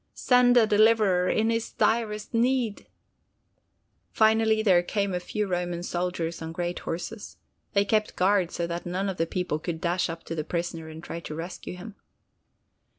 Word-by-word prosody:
Send 250 -1 +4
a 230 - +7
deliverer 210 -4 +4
in 220 +1 +2
his 230 0 -2
direst 215 -2 0
need!" 240 -2 0 1.2
Finally 220 0 +3
there 185 -5 +5
came 200 +2 -1
a 180 - 0
few 210 +4 -3
Roman 175 -2 -2
soldiers 175 -2 -3
on 160 0 -5
great 175 +1 -3
horses. 180 +6 -6 0.4
They 200 0 +3
kept 215 +1 0
guard 190 -1 +2
so 170 - -3
that 170 0 -4
none 190 +3 -1
of 190 - -4
the 165 - 0
people 180 -4 -2
could 165 0 -4
dash 175 +1 0
up 165 0 -6
to - - -6
the 155 -2 -2
prisoner 165 -1 -4
and 160 +1 -10
try 170 - -6
to 155 -2 -7
rescue 170 +2 -6
him. 215 +4 -9
180 Hz, 170 wpm, -26 LUFS, 170-220 Hz, 1.2 s, a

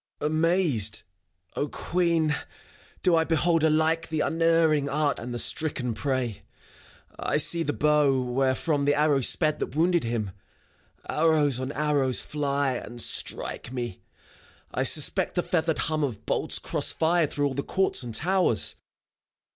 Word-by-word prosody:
FAUST. 150 - -1
Amazed, 155 - +1 0.5
O 145 - -1
Queen, 170 -2 0 0.7
do 180 - +4
I 160 - +3
behold 165 0 +1
alike 160 +1 +2
i60 - - -21
FAUST. - - -19
The 160 -1 -2
unerring 165 -3 +2
archer 145 0 -1
and 120 +1 -6
the 120 - -4
stricken 125 -3 -1
prey. 130 -3 -3 0.8
I - - -1
see 170 - +5
the 150 - -1
bow, 150 -2 +2
wherefrom 135 +4 0
the 145 - +2
arrow 150 -2 +2
sped 155 +4 +2
That - - -5
wounded 170 +1 +2
him. 115 -4 -3 0.8
Arrows 150 -5 +2
on 130 +1 -4
arrows 145 -4 +1
fly, 140 -2 -2
And 120 0 -9
strike 120 - 0
me. 120 -6 -5 0.7
I - - -1
suspect 155 +7 +2
the 175 - 0
feathered 160 -3 -1
hum 155 -1 -1
Of 115 -6 -4
bolts - - 0
cross - - 0
fired 165 -1 +1
through 145 - -1
all 140 - -1
the 140 - -2
courts 190 +6 +1
and 120 -3 -5
towers. 175 - +2
150 Hz, 155 wpm, -26 LUFS, 130-160 Hz, 0.8 s, see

